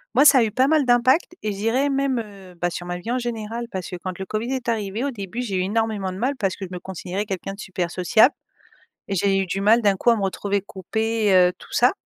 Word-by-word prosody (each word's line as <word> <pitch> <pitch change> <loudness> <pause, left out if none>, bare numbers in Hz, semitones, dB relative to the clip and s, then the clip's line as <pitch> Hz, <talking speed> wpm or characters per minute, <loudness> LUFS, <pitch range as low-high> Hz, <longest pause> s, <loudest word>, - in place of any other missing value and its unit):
Moi, 270 - +6
ça 280 -2 +8
a - - +4
eu 215 - -3
pas 255 +5 +3
mal 310 -3 +3
d'impact 255 +8 +3
et 215 - -1
je 195 - -6
dirais 245 +7 +1
même, 275 -2 0
heu, 195 -3 -14
bah, 175 +1 -1
sur 175 0 -6
ma 175 - -3
vie 215 +7 -5
en 250 - +1
général, 235 -1 -4
parce 185 -2 -4
que 180 - -5
quand 185 +1 -6
le 190 - -4
Covid 225 +6 -3
est 255 -2 -3
arrivé, 215 +1 -2
au 280 - -1
début, 210 0 -5
j'ai 205 -6 -2
eu - - +1
énormément 210 -2 -1
de - - -7
mal 260 +6 0
parce 195 -4 -1
que 200 - -8
je - - -11
me 180 - -5
considérais 190 +2 -5
quelqu'un 195 -1 -4
de - - -18
super 180 -4 -3
sociable. 215 - +4 0.7
Et 200 - -3
j'ai 195 +1 +2
eu 195 - 0
du 195 +2 -3
mal 225 +4 +5
d'un 200 -2 +4
coup 240 - +2
à 235 - +5
me 200 - -2
retrouver 200 +1 -1
coupée, 220 +3 -1
heu, 180 0 +5
tout - - -15
ça. - - +4
210 Hz, 275 wpm, -23 LUFS, 190-235 Hz, 0.7 s, ça